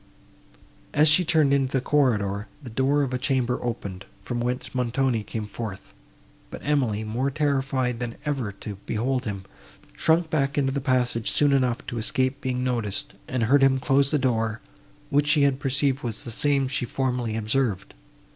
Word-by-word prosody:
As 150 +1 +6
she 155 +4 +5
turned 155 -4 +3
into 135 -1 +1
the - - +2
corridor, 105 -8 +1 0.2
the 125 - -8
door 135 +5 +2
of 130 -2 -3
a 125 - -1
chamber 130 -2 0
opened, 100 -6 -4 0.2
from 120 +5 -3
whence 125 +1 -3
Montoni 125 -1 0
came 110 +1 -5
forth; 105 -2 -7 0.6
but - - -8
Emily, 125 -8 +1
more 120 +6 -1
terrified 135 -4 0
than 120 -2 -4
ever 135 -8 -1
to 100 0 -8
behold 125 +3 -1
him, 100 -3 -4 0.5
shrunk 165 0 +2
back 140 -2 0
into 135 -2 +2
the 140 +1 -2
passage 125 -4 +1
soon 145 -1 +3
enough 125 -3 +1
to 120 - -4
escape 130 +4 0
being 125 -1 -1
noticed, 115 -7 -2
and 125 -2 -1
heard 135 +5 +4
him 135 -1 +4
close 135 +1 +3
the 150 - +2
door, 115 -4 0 0.5
which 145 +1 +3
she 150 -1 +4
had 140 -1 +2
perceived 140 0 +1
was 115 -3 -3
the 120 - -5
same 140 +2 +2
she 135 -1 -2
formerly 125 -3 -1
observed. 110 -3 -1
130 Hz, 175 wpm, -25 LUFS, 115-140 Hz, 0.6 s, As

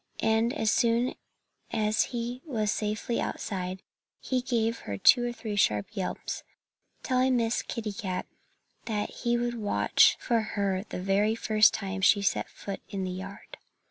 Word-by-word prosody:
And 225 +2 +3
as 220 -7 +1
soon 235 +2 +2 0.6
as 215 0 +2
he 240 0 -4
was 220 -9 -1
safely 215 +3 -1
outside 185 -1 -4 0.4
he 255 -1 -1
gave 230 -2 0 0.2
two 245 - +7
or 240 - -1
three 225 -3 -5
sharp 105 - +1
yelps, 190 -3 -3 0.6
telling 255 0 +2
Miss 230 0 +1
Kitty 220 -3 -4
Cat 185 -2 -3 0.6
that 210 -3 -2
he 240 0 0
would 240 0 -1
watch 205 -2 +4
for 235 -2 +1
her 200 -2 -1
the - - -4
very 205 +3 +2
first 215 -2 +4
time 195 -1 -4
she 200 +1 +5
set - - 0
foot 200 -1 -7
in 195 -1 -3
the 185 - -2
yard. 190 +2 -8
215 Hz, 150 wpm, -28 LUFS, 200-235 Hz, 0.6 s, two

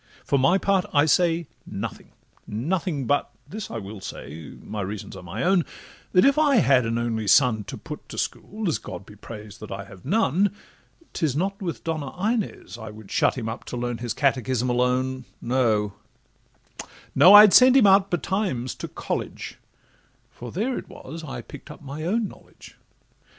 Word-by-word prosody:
For 140 - +2
my 170 +9 +4
part 195 -1 +1
I 145 +1 +6
say 170 +1 +2 0.2
nothing—nothing—but 145 - -3 0.2
This 210 +7 -6
I 115 - -5
will 100 -1 -8
say—my 80 +3 -8
reasons 100 +1 -6
are 95 - -9
my 95 +7 -5
own— 180 -1 +3 0.5
That 180 - +6
if 280 +2 +4
I 290 -3 +4
had 130 - +4
an 115 0 -1
only 115 -2 -2
son 110 -3 +4
to - - -7
put - - -9
To - - -8
school 215 0 -3
(as 160 - 0
God 95 +1 -8
be 105 - -14
praised 105 0 -10
that 105 - -9
I 100 0 -5
have 95 -3 -14
none), 205 - +2 0.6
'Tis 150 -5 0
not 195 +5 -1
with 175 -4 -4
Donna 155 -4 -3
Inez 215 - -2
I 110 -1 -7
would 105 -1 -12
shut - - +2
Him 115 -3 -3
up 115 +1 -5
to 125 - -5
learn 120 -1 -3
his 120 -1 -3
catechism 130 -3 +1
alone, 125 +1 0
No—no—I'd 125 - +3
send 255 +1 +8
him 250 - +6
out 195 0 +5
betimes 175 - -1
to - - -4
college, - - -5 0.7
For 120 -1 -9
there 235 +8 -1
it - - -12
was 160 +4 -9
I 145 - -6
pick'd 145 - -12
up - - -11
my 140 +2 -7
own 210 +7 0
knowledge. - - -15
135 Hz, 165 wpm, -24 LUFS, 115-185 Hz, 0.7 s, send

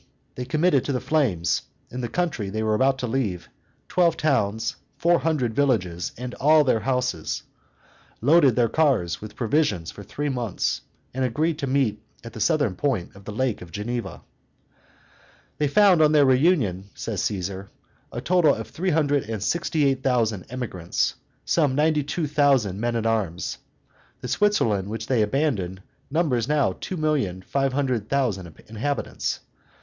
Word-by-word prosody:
they 125 - -5
committed 150 +1 +2
to - - -2
the 130 - 0
flames, 115 - +1 0.3
in 125 - -4
the 120 - -3
country 150 - -1
they 110 +2 -2
were 110 0 +1
about 130 +4 +3
to 130 - -3
leave, 105 - -2 0.4
twelve 170 -3 +2
towns, 110 -8 0 0.2
four 170 +4 +3
hundred 140 -8 0
villages, 95 -11 0
and 125 +1 -6
all 155 +2 +5
their 130 -5 +2
houses; 125 -8 -1 0.8
loaded 140 -1 +5
their 120 -2 +3
cars 120 - +1
with 105 0 -9
provisions 110 - 0
for - - -11
three 145 +9 -4
months, 120 -8 -1 0.3
and 130 +1 -1
agreed 150 +6 0
to 140 - -2
meet 130 -6 +1 0.2
at 115 -1 -9
the - - -8
southern 145 - +2
point 110 -7 -2
of 100 0 -15
the - - -5
Lake 125 +1 -1
of 90 -1 -10
Geneva. 120 +4 -4 1.4
They 150 - +2
found 185 +2 +5
on 155 0 +5
their 145 -2 +6
reunion, 130 - +2
says 105 -5 -3
Caesar, 95 -1 -3 0.4
a 120 - -5
total 175 +1 +3
of - - -7
three 185 +3 -2
hundred 145 -6 +1
and 110 -3 -3
sixty 165 -1 0
eight 135 -1 +1
thousand 115 -7 0
emigrants, 115 -9 -2 0.3
including 145 -6 +2
ninety 150 0 +2
two 155 +3 -2
thousand 140 -10 +2
men 120 +1 -1
at 115 -1 -1
arms. 105 -7 -1 0.6
The - - -5
Switzerland 115 - +1
which 110 0 -4
they 120 -1 +1
abandoned 105 - -1 0.3
numbers 140 -7 +1
now 150 -2 +2
two 185 - -4
million 140 - 0
five 135 +5 0
hundred 130 -6 -1
thousand 100 - -1
inhabitants. 120 +7 -3
125 Hz, 160 wpm, -24 LUFS, 105-150 Hz, 1.4 s, their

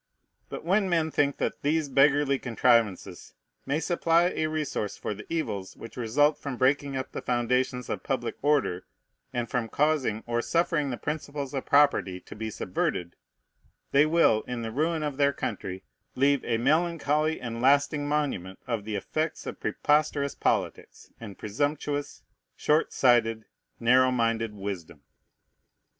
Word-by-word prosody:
But - - -7
when 195 +2 +2
men 165 -2 +1
think 140 -1 +1
that - - -2
these 155 +1 +1
beggarly 140 0 +3
contrivances 115 -4 +1 0.3
may 140 +3 +1
supply 170 +1 +2
a 155 - 0
resource 150 -9 -3
for - - -3
the 105 +7 -11
evils 100 - -3
which 115 - -10
result 145 +6 +2
from 140 -3 -5
breaking 135 +1 +1
up 130 - -5
the - - -5
foundations 125 0 0
of - - -3
public - - -2
order, 140 -11 +1 0.5
and 120 -1 -2
from 115 -1 -2
causing 140 -7 +1
or 120 0 0
suffering 165 -1 0
the 125 - -3
principles 145 -2 -4
of 135 - -4
property 140 -10 +3
to - - -12
be 110 +1 -4
subverted, 90 -3 -2 0.8
they 145 +2 +5
will, 155 -9 +4
in 125 -2 -4
the 115 - -4
ruin 155 +5 0
of 145 -3 -3
their 140 -1 +3
country, 95 -5 -5 0.3
leave 140 +1 +3
a 115 - +1
melancholy 155 +2 +1
and 115 -1 -5
lasting 145 +2 +3
monument 140 -12 -2
of 115 -4 -3
the 110 -1 -3
effect 155 - -3
of - - -6
preposterous 145 -1 +1
politics, - - -2
and 105 -4 -9
presumptuous, 145 +6 -3 0.3
short 155 +2 +1
sighted, 115 -3 +3 0.3
narrow 130 +2 +5
minded 115 -3 0
wisdom. 90 -7 -6
135 Hz, 150 wpm, -27 LUFS, 115-150 Hz, 0.8 s, they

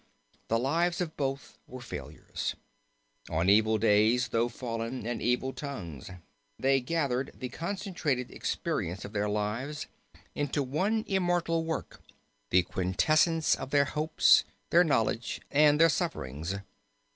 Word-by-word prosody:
The 115 - +2
lives 165 +8 +1
of 170 -3 -3
both 135 -1 -4
were 130 - -9
failures. 120 - -5 0.7
'On 80 +3 0
evil 110 +2 +5
days 110 +3 +3
though 115 +1 +1
fallen, 115 0 -4
and 120 0 -3
evil 125 +2 0
tongues,' 90 - -7 0.5
they 135 0 +2
gathered 135 -2 -1
the 125 - -5
concentrated 170 - -3
experience 90 +3 -3
of 100 - -9
their 105 0 0
lives 110 +8 -2 0.5
into 145 0 -1
one 190 - 0
immortal 175 -3 +1
work, 160 -2 -4 0.5
the 90 0 +4
quintessence 155 - +2
of - - -3
their 140 0 +4
hopes, 155 +2 +4 0.3
their 175 +1 +7
knowledge, 120 -6 0
and 150 +1 +5
their 165 - +8
sufferings. 90 - -2
130 Hz, 125 wpm, -29 LUFS, 110-160 Hz, 0.7 s, their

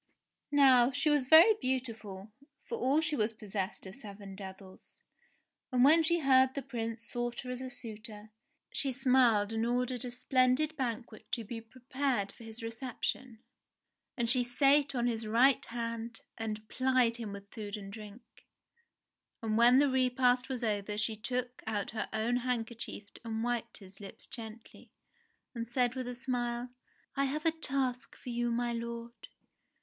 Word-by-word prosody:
Now 260 -4 +6
she 300 +3 +1
was 290 -4 +2
very 330 +9 +9
beautiful, 225 -6 -3 0.3
for - - -4
all 285 0 +3
she 320 -2 +1
was 220 -2 +1
possessed 200 -3 -4
of 190 - -8
seven 200 -4 -9
devils, 190 -1 -11 0.7
and 250 -1 +4
when 315 +5 +7
she 340 +1 +2
heard 260 -1 +5
the 280 - -3
Prince 230 -3 -4
sought 240 0 -3
her 250 - -6
as 250 0 -5
a 260 - -5
suitor, 220 -3 -6 0.4
she 275 - 0
smiled 245 -5 +3
and 225 0 0
ordered 245 +1 0
a 250 - -4
splendid 255 +4 +2
banquet 235 -4 -4
to 235 - 0
be 225 +2 -6
prepared 255 -2 -2
for - - -15
his 225 +1 -9
reception. 235 0 -4 0.7
And 235 -2 +1
she 250 +1 +4
sate 275 +3 +3
on 240 -1 +1
his 225 -2 -1
right 245 +5 +4
hand, 230 -1 -5
and 215 -1 -5
plied 255 -2 +2
him 225 -4 -5
with 200 0 -10
food 210 -2 -5
and 200 -1 -9
drink. 215 +2 -10 1.2
And 215 -1 0
when 240 +3 +7
the 285 +1 +5
repast 255 -1 +2
was 255 -2 -3
over 210 -1 -1
she 220 +1 0
took 250 +3 -3
out 210 -2 -2
her 220 - -3
own 225 +3 +1
handkerchief 235 -4 -3 0.2
and 225 -1 -3
wiped 240 -1 -2
his 195 -1 -13
lips 195 - -10
gently, 225 -1 -10 0.6
and 230 -2 -5
said 245 0 +1
with 255 -1 -4
a 250 - -4
smile: 245 -1 -2 0.5
"I 275 - +2
have 300 +4 -3
a 325 - +5
task 265 -5 -2
for - - -10
you, 240 0 0
my 240 0 0
lord 235 0 -5
240 Hz, 165 wpm, -32 LUFS, 220-260 Hz, 1.2 s, very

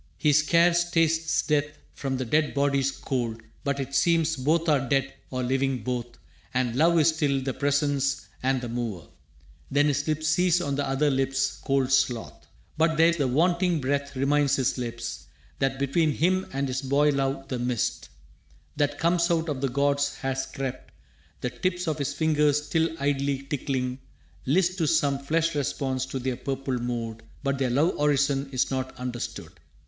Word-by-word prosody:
He 150 -2 +3
scarce 170 +3 +4
tastes 165 0 +2
death 145 0 0 0.2
from 135 -1 -3
the 130 - -2
dead 150 +5 +1
body's 140 -1 +2
cold, 120 -4 -3 0.2
But 140 -1 -1
it 135 0 -4
seems 165 +1 +3
both 155 +5 +1
are 135 -5 +2
dead 135 -1 +1 0.2
or 130 -1 -3
living 130 -1 0
both 120 0 -4 0.4
And 125 -2 0
love 165 +5 +4
is 155 -1 +5
still 150 -4 +1
the 135 0 -2
Presence 140 0 0
and 130 0 +1
the 125 - -4
Mover. 115 -8 -4 0.6
Then 145 +2 +3
his 145 +1 -1
lips 155 0 0
cease 180 +2 +3
on 145 -5 -2
the 140 0 -1
other 145 +2 +2
lips' 135 0 0
cold 135 -1 +1
sloth. 125 -3 0 0.3
But 160 -1 +3
there 165 +1 +6
the 145 -5 0
wanting 170 +5 +2
breath 140 +1 -2
reminds 140 +1 +2
his 130 -1 0
lips 115 -1 -5 0.3
That 135 0 0
between 145 +3 +1
him 185 +5 +1
and 135 +1 -1
his 130 0 -2
boy 140 +2 +3
love 135 -1 -1
the 125 - -2
mist 120 -10 -2 0.7
That 145 -1 +1
comes 170 +1 +2
out 165 -1 +1
of 135 -3 -3
the 135 - +1
gods 140 +2 +1
has 135 0 -3
crept. 130 -10 -6 0.5
The 125 - -2
tips 180 +3 -2
Of 155 -1 -1
his 140 - -1
fingers, 150 -2 +2
still 160 +2 +1
idly 140 -1 0
tickling, 130 -2 -2 0.5
list 180 +5 +2
To 160 - +1
some 145 -3 +2
flesh 165 +4 0
response 130 -2 -2
to 135 - -4
their 130 -1 -2
purple 135 -2 -3
mood. 115 -2 -4 0.2
But 140 -1 -1
their 130 -2 +1
love 145 +8 +1
orison 140 -1 +2
is 130 0 0
not 130 0 -3
understood. 125 -1 -5
140 Hz, 175 wpm, -26 LUFS, 130-155 Hz, 0.7 s, there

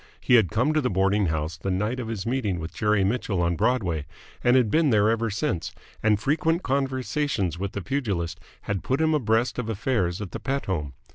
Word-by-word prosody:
He - - +1
had 110 -8 +6
come 125 +8 +1
to 155 - +2
the 125 - 0
boarding 95 +1 +2
house 80 0 -2
the 95 - -4
night 105 +7 -1
of 120 - -4
his 110 -3 -4
meeting 115 -7 -1
with 80 +1 -6
Jerry 105 -2 +2
Mitchell 100 -2 0
on 85 0 +1
Broadway, 95 - 0 0.4
and 120 +1 +5
had 120 -5 +3
been 160 -2 +3
there 110 -2 +4
ever 115 0 0
since, 90 -5 -2 0.3
and 105 -1 +3
frequent 160 - +1
conversations 130 - -1
with 100 0 -3
the 100 - -4
pugilist 95 -12 -2 0.2
had 100 -3 -3
put 130 +3 0
him 160 0 +3
abreast 120 -3 +1
of 115 -2 -3
affairs 105 -5 0
at 100 -4 -6
the - - -5
Pett 140 +1 -2
home. 75 -8 -2
110 Hz, 210 wpm, -25 LUFS, 95-130 Hz, 0.4 s, had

